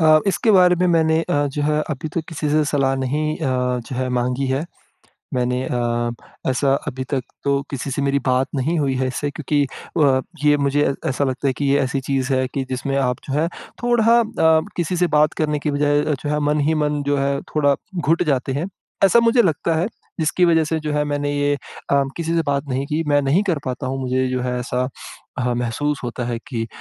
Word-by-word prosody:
अ, 155 -1 +6
इसके 220 +4 +2
बारे 180 -3 +6
में 180 - +4
मैंने 160 -1 +3
अ, 145 -2 0
जो 145 +1 -3
है 150 +1 +1
अभी 150 +2 -3
तो 165 - +1
किसी 150 -2 -3
से 155 0 +3
सलाह 135 -2 +1
नहीं 150 +4 -1
अ, 125 -4 0
जो 125 +2 -7
है 130 0 -1
माँगी 125 +2 -1
है। 135 +4 0 0.7
मैंने 125 0 0
अ, 120 -1 -1 0.4
ऐसा 135 +1 +2
अभी 130 -2 -3
तक 135 -2 +1 0.2
तो 140 0 +1
किसी 135 0 -4
से 140 - -1
मेरी 140 0 +1
बात 130 +1 +2
नहीं 155 +6 0
हुई 135 -2 +1
है 130 0 0
इससे 145 +3 -2
क्योंकि 145 0 0 0.4
अ, 130 -2 +4 0.2
ये 150 0 +5
मुझे 140 0 +1
ऐसा 135 +2 0
लगता 130 +1 -1
है 130 - +2
कि 145 - -1
ये 140 +1 +3
ऐसी 135 +1 -1
चीज़ 135 0 -1
है 130 0 +1
कि 135 - -1
जिसमें 135 +2 -2
आप 125 -2 +1
जो 135 - -3
है 165 - +2 0.4
थोड़ा 240 -2 +3
अ, 160 -8 +3 0.2
किसी 175 +1 -1
से 180 - +3
बात 150 0 +4
करने 150 -1 0
की 150 0 -1
बजाए 145 0 +2
अ, 155 - +1
जो 145 - -2
है 150 0 +1
मन 150 - +1
ही 160 - +2
मन 150 -1 0
जो 145 0 +2
है 140 0 0 0.2
थोड़ा 145 -2 +4 0.3
घुट 165 +4 +2
जाते 135 -3 0
हैं। 155 +7 -2 0.4
ऐसा 215 +5 +5
मुझे 235 +1 +4
लगता 165 -1 +1
है 170 +5 +1 0.3
जिसकी 160 +3 +2
वज़ह 165 -1 +4
से 160 +1 -1
जो 150 -1 -3
है 150 0 +1
मैंने 145 0 -1
ये 145 0 +1
अ, 140 0 -2
किसी 165 0 -2
से 165 - +3
बात 140 -1 +1
नहीं 135 +2 -1
की, 155 +2 -1
मैं 145 -1 +3
नहीं 150 +9 +2
कर 160 -4 +1
पाता 130 +1 -3
हूँ 135 +1 -3
मुझे 130 0 0
जो 130 -1 -1
है 125 0 -1
ऐसा 125 +1 -1 0.5
अ, 125 -1 0
महसूस 125 +5 -1
होता 120 +1 -4
है 120 -1 -2
कि 115 -4 -2
अ, - - -7
145 Hz, 230 wpm, -21 LUFS, 130-155 Hz, 0.7 s, अ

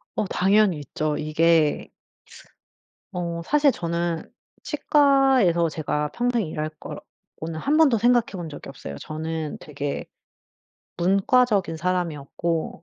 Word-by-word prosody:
어 210 - 0
당연히 195 -2 +3
있죠. 150 +2 -2
이게 155 0 +2 1.2
어 170 -1 -4
사실 295 - +3
저는 170 -2 -3 0.3
치과에서 270 - +3
제가 150 -1 -2
평생 240 -4 0
일할 155 0 -3
거 - - -7 0.4
고는 160 0 -5
1 290 - +1
번도 280 -8 +5
생각해 240 +1 +3
본 175 -4 -5
적이 145 - -10
없어요. 70 - -8
저는 155 - -5
되게 145 -1 -5 0.9
문과적인 195 0 +2
사람이었고 170 -2 -2
170 Hz, 235 characters per minute, -24 LUFS, 155-225 Hz, 1.2 s, 번도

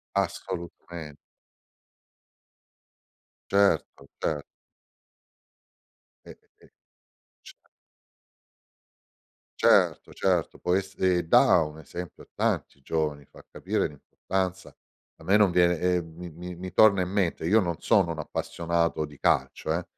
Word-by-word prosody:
Assolutame 85 -4 -4 2.3
Certo, 100 -8 +2
ce 75 -2 -2 1.8
E - - -11
e - - -10 0.3
e - - -17 0.8
c - - -11 2.1
Certo, - - +3
certo, 90 -4 0
poi 90 +2 +2
se 95 -2 -1
da 85 +1 +5
un 75 +1 -9
esempio 90 +3 -8
a - - -19
tanti 70 - -2
giovani, 75 -1 -2
fa - - -17
capire - - -1
l'importanza. 95 +5 -4 0.5
A - - -16
me 100 +2 +4
non 105 -3 +5
viene 90 -1 +3
ehm, 90 -3 0
mi 90 0 -8
mi 90 +3 -8
mi 90 +1 -8
torna 100 -1 +5
in 90 - -3
mente 95 -6 -1
io 105 +7 +4
non 85 -5 0
sono 95 -7 +3
un 80 - -6
appassionato 85 +1 -1
di 75 -2 -10
calcio, 80 - 0
eh, 85 0 -2
85 Hz, 115 wpm, -27 LUFS, 80-95 Hz, 2.3 s, da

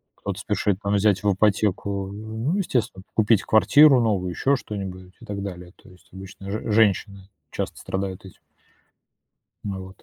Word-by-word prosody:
Кто-то - - -5
спешит 100 -3 0
там 100 -1 -1
взять 100 -2 +2
в 100 - +3
ипотеку, 100 -1 0
ну, 110 - -3
естественно, 120 - -1
п - - -47
купить 110 -1 +3
квартиру 135 +4 +6
новую, 100 -5 0
ещё 140 +10 +1
что-нибудь 95 -6 -7
и - - -11
так 100 -1 -5
далее. 90 -2 -8
То - - -17
есть 90 -1 -20
обычно 95 +1 -10
ж 110 +1 -3
женщины 100 -2 +1 0.2
часто - - -4
страдают 95 0 -4
этим. 95 - -14 1.2
Вот. 95 -1 -7
100 Hz, 155 wpm, -24 LUFS, 95-110 Hz, 1.2 s, квартиру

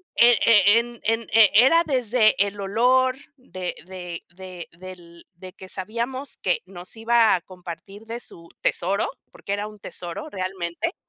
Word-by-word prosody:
eh 240 -1 +6
eh, 210 -1 +7
en, 235 0 -6
en, 225 +1 +1
eh, 220 -2 +7
era 265 +10 +6
desde 245 -5 +2
el 200 0 -7
olor 250 +6 +2 0.2
de 185 -8 -6
de 180 -2 -7
de 180 0 -10
del 175 -2 -12
de 185 +1 -12
que 190 - -12
sabíamos 235 +8 -4
que 180 - 0
nos 180 +1 -8
iba 230 0 +3
a 180 - -4
compartir 185 +3 -11
de 230 +1 -6
su 170 -7 -10
tesoro, 195 +3 0 0.2
porque 200 - -6
era 205 +1 -3
un 210 -1 -13
tesoro 175 - -7
realmente. 185 - -4
200 Hz, 155 wpm, -23 LUFS, 185-235 Hz, 0.2 s, eh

